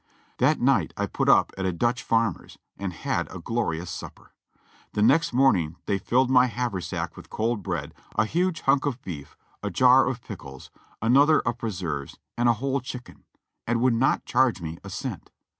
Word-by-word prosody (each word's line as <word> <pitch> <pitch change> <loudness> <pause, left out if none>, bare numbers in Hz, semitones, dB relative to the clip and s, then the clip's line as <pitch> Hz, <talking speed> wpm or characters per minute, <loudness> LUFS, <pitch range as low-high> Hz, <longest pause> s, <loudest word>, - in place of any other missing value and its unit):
That - - +3
night - - +2
I - - 0
put - - -1
up - - +5
at 95 - -1
a - - +1
Dutch 120 +8 0
farmer's 115 -1 -1 0.2
and 100 -2 -4
had 85 - -2
a - - -7
glorious 90 -4 -2
supper. - - -9 0.6
The 105 - +1
next 145 +9 +4
morning 100 - +3
they 100 -1 0
filled 125 +6 +2
my 125 0 +6
haver 120 -6 -2
sack 85 - -4
with - - -12
cold 110 0 -1
bread, - - -4 0.2
a 110 - +3
huge 175 +7 0
hunk 135 +1 +2
of 130 -3 -2
beef, 75 -6 -8 0.2
a - - -2
jar 130 +1 +5
of 125 -2 -3
pickles, 70 - -10 0.3
an 115 +3 +4
other 145 +3 +6
of 115 +1 -2
preserves 85 -10 -4 0.2
and 120 0 +2
a - - +5
whole 135 +4 -1
chicken, 125 -1 -9 0.4
and 120 0 +1
would 125 0 +3
not 125 +3 +1
charge 130 -4 +2
me 80 -1 -6
a 100 - -8
cent. 95 - -6
115 Hz, 190 wpm, -25 LUFS, 95-130 Hz, 0.6 s, my